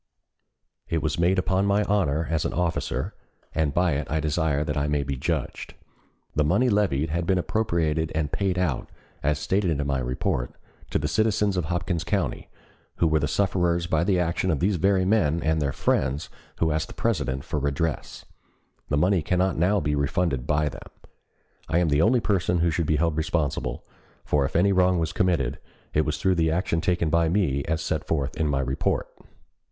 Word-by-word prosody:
It 80 -1 -1
was 80 +1 -1
made 90 +3 +3
upon 95 +1 +1
my 100 +1 +3
honor 85 -7 +1
as 80 -2 +1
an - - -2
officer, 85 -6 -1 0.4
and 80 -3 +1
by 90 +3 +2
it 70 -2 -2
I 80 +2 0
desire 75 -1 0
that 75 - -3
I 75 0 0
may 75 -1 0
be 70 0 -3
judged. 65 - -3 0.6
The 75 - +2
money 100 - +2
levied 85 - +1
had 85 +1 -1
been 95 -1 +3
appropriated 85 -6 0
and 75 -2 -1
paid 95 -2 0
out, 85 -8 -1 0.3
as 75 0 +1
stated 95 +4 0
in 70 - -1
my 70 -1 0
report, 60 -1 -2 0.3
to - - +1
the 75 - -1
citizens 105 +2 +1
of 90 -3 -1
Hopkins 85 0 -2
County, 90 -12 -2 0.5
who - - +1
were 80 -1 +3
the 75 - 0
sufferers 85 -1 +1
by 80 -1 +1
the 95 0 +2
action 90 +1 0
of 80 -5 +1
these 95 +1 +1
very 95 +1 +2
men 85 -6 +2
and 80 0 +1
their 70 -2 0
friends, 70 +3 0 0.3
who 80 -1 +1
ask 80 +1 -1
the - - -11
President 65 0 -1
for 75 -1 -2
redress. 70 +3 -2 0.6
The 75 - +1
money 90 +3 +3
cannot 90 +3 +1
now 95 +5 +2
be 75 -3 -1
refunded 70 -2 0
by 75 0 +2
them. - - -11 0.8
I 80 - +2
am 85 -2 +2
the 70 +1 +3
only 120 +6 +4
person 90 -4 +1
who 85 0 +2
should 80 0 -1
be 80 - +2
held 80 +1 +1
responsible, 80 -2 -1 0.4
for 70 -2 +2
if - - -5
any 95 +4 +4
wrong 90 -1 +3
was 80 -2 -1
committed 85 -9 0 0.3
it 75 - +2
was 75 -1 -1
through 95 +4 +2
the 80 - +3
action 80 0 0
taken 85 -2 0
by 85 0 +3
me 80 -7 +1
as 80 0 -1
set - - -2
forth 70 -4 -1
in 80 - 0
my 70 -2 +1
report. 65 0 -1
80 Hz, 195 wpm, -25 LUFS, 75-90 Hz, 0.8 s, only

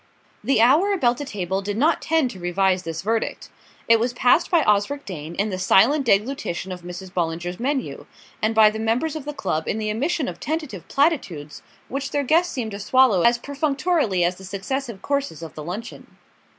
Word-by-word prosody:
The 270 -5 +2
hour 310 - +4
about 245 -10 +1
the 290 - -4
table 190 -5 -3
did 205 +1 -4
not 310 +7 +2
tend 320 -6 +1
to 190 - -11
revise 185 +1 +1
this 165 -1 -5
verdict. 225 +2 -2 0.4
It 230 0 +5
was 240 +2 0
passed 250 +8 +3
by 340 -4 +3
Osric 210 +8 +1
Dane 165 -3 -7
in 205 +3 -1
the 185 - -3
silent 240 +9 +4
deglutition 205 - 0
of 180 -1 -6
Mrs. 180 +2 -8
Bollinger's 175 0 -3
menu, 270 +2 -3 0.3
and 220 +1 +1
by 215 -1 +7
the 220 - -6
members 235 +8 0
of 305 -3 -6
the 295 - -3
club 160 - -2
in - - -1
the 215 -1 -2
emission 285 +6 -1
of - - -6
tentative 300 - -4
platitudes 255 - -1 0.3
which 275 +1 -4
their 285 0 -1
guest 335 +6 +2
seemed 230 -4 -4
to 200 - -6
swallow 230 -2 +4
as 235 +4 +4
perfunctorily 285 - 0
as 180 +1 0
the 190 - -12
successive 200 +3 -4
courses 280 - -2
of 160 - -8
the 155 - -8
luncheon. 205 +8 -8
225 Hz, 195 wpm, -23 LUFS, 185-280 Hz, 0.4 s, by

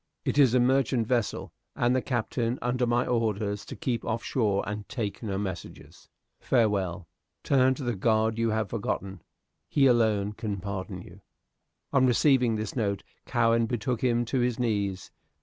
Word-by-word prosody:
It - - +1
is 130 -4 +5
a - - +5
merchant 125 -1 +2
vessel, 120 -2 -1 0.2
and 120 +1 +2
the 130 - +2
Captain 120 0 -1
under 125 0 0
my 120 +1 +2
orders 105 -4 -1
to - - -8
keep 125 -8 -2
off 115 +1 -2
shore 105 -6 0
and 105 0 -5
take 110 -5 -4
no 100 -4 -3
messages. 95 -4 -7 0.3
Farewell. 100 -7 0 0.4
Turn 130 -1 +3
to 140 - -7
the 120 -1 -1
God 110 +2 +1
you 115 0 +2
have 110 0 -1
forgotten. 100 -4 -3 0.5
He 140 - +3
alone 110 -5 +3
can 105 -2 -4
pardon 95 -1 -5
you." 90 +3 -14 0.7
On 130 -2 +4
receiving 125 -2 +3
this 110 -1 -4
note, 100 -5 -1 0.2
Cowen 115 -1 +2
betook 120 0 -2
him 120 -1 +2
to 130 +3 -1
his 120 -1 +1
knees. 100 -6 -1
115 Hz, 165 wpm, -27 LUFS, 105-125 Hz, 0.7 s, is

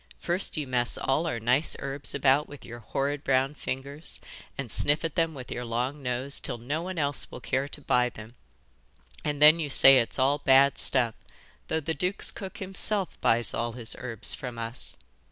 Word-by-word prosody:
'First 175 0 -1
you 150 - -2
mess 125 -2 -1
all 150 +5 0
our 120 -8 -2
nice 125 +7 +1
herbs 140 +1 -6
about 140 +1 +2
with 145 - -12
your 120 +1 -9
horrid 140 +5 -3
brown 135 +1 +1
fingers 140 +2 -6 0.4
and 130 -5 -4
sniff 150 +3 +4
at 160 - -3
them 165 -2 0
with 130 -2 -9
your 125 - -4
long 125 +5 -3
nose 125 +2 -3
till - - -2
no 140 +8 -4
one 185 +1 -6
else 145 -2 -1
will - - -9
care 135 +2 -2
to 145 - -3
buy 125 -3 +1
them, 110 0 -12 0.9
and 145 -1 -2
then 155 +2 +8
you 150 -3 -3
say 135 0 +7
it's 115 - -2
all 140 +2 +2
bad 135 0 +4
stuff, 120 -4 +2 0.5
though 160 - -1
the 160 +1 -3
duke's 180 +4 -1
cook 190 -2 -8
himself 195 0 +2
buys 115 +1 +1
all 115 0 -2
his 115 -2 -2
herbs 120 -3 -1
from 125 -3 -7
us. 115 +1 -3
135 Hz, 190 wpm, -27 LUFS, 125-150 Hz, 0.9 s, then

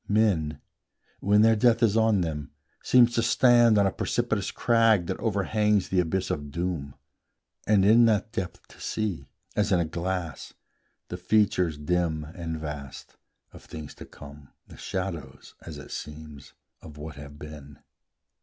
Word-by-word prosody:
Men, 95 -9 +1 0.6
when 105 +2 +4
their 115 0 +5
death 115 +1 +3
is 110 -2 +3
on 110 -3 +3
them, 75 -4 -4 0.3
seem 125 -1 +6
to 120 0 -1
stand 120 -1 +5
On 100 - +4
a 95 - +1
precipitous - - -1
crag 115 -5 +3
that - - -4
overhangs 105 -1 +1
The 95 - +1
abyss 90 +2 -1
of 75 -1 -4
doom, 80 -3 -4 0.7
and 100 -3 +4
in 115 +3 +6
that 110 -1 +1
depth 95 -6 -5
to - - -17
see, 95 -11 -3 0.3
As 105 -1 +1
in 90 - +4
a 85 - +1
glass, 85 0 -4 0.6
the - - -5
features 90 -7 +1
dim 80 0 -1
and 80 0 -6
vast 70 -3 -8 0.4
Of - - -13
things 75 -2 -9
to - - -11
come, 70 -1 -13 0.2
the - - -14
shadows, 85 -8 -6
as - - -9
it - - -11
seems, 75 -2 -9 0.3
Of 75 -2 -12
what 75 +1 -7
have 70 0 -11
been. 75 -1 -11
90 Hz, 155 wpm, -26 LUFS, 75-105 Hz, 0.7 s, seem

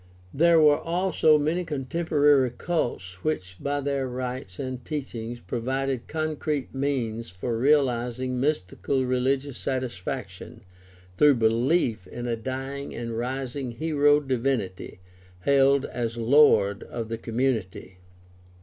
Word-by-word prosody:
There 165 +3 +5
were 150 -2 +5
also 170 -2 +3
many 155 +5 0
contemporary 145 -2 +2
cults 120 - -3
which 95 -12 -2
by 145 0 -1
their 140 -1 -1
rites 125 -6 -5
and 130 -2 -5
teachings 120 -6 -5
provided 130 +5 -2
concrete 155 -2 -2
means 125 -5 -2
for 105 +7 -4
realizing 125 -1 +1
mystical 135 0 0
religious 130 +2 0
satisfaction 115 -6 -4 0.6
through 145 -2 +6
belief 115 - +1
in 120 +6 -6
a 120 -1 0
dying 135 +4 -5
and 115 -1 -4
rising 130 +1 -3
hero 145 0 +3
divinity 125 -10 -2 0.4
hailed 140 +2 +4
as 120 -1 -3
Lord 115 -5 +4
of 115 -2 -6
the 115 0 -4
community. 115 -7 -2
130 Hz, 115 wpm, -26 LUFS, 115-145 Hz, 0.6 s, through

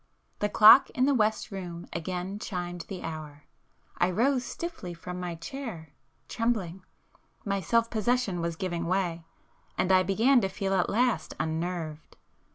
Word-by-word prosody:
The 210 - 0
clock 220 +6 +8
in 255 - +3
the 285 - +3
west 220 -4 +1
room 175 -3 -6
again 180 +4 -4
chimed 175 -4 -5
the 190 -3 -7
hour. 155 -2 -7 0.6
I 175 - +3
rose 250 +7 +2
stiffly 255 - -6
from 180 +2 -7
my 175 -1 -4
chair, 170 - -7 0.3
trembling,—my 200 -2 -4
self 230 +6 +2
possession 220 -4 0
was 170 0 -2
giving 170 -2 -3
way, 175 -3 -1 0.5
and 185 - +1
I 185 0 +6
began 225 +8 +3
to 195 - 0
feel 195 0 -2
at 185 -2 +2
last 245 +2 +1
unnerved. 160 -1 -4
185 Hz, 145 wpm, -28 LUFS, 170-220 Hz, 0.6 s, clock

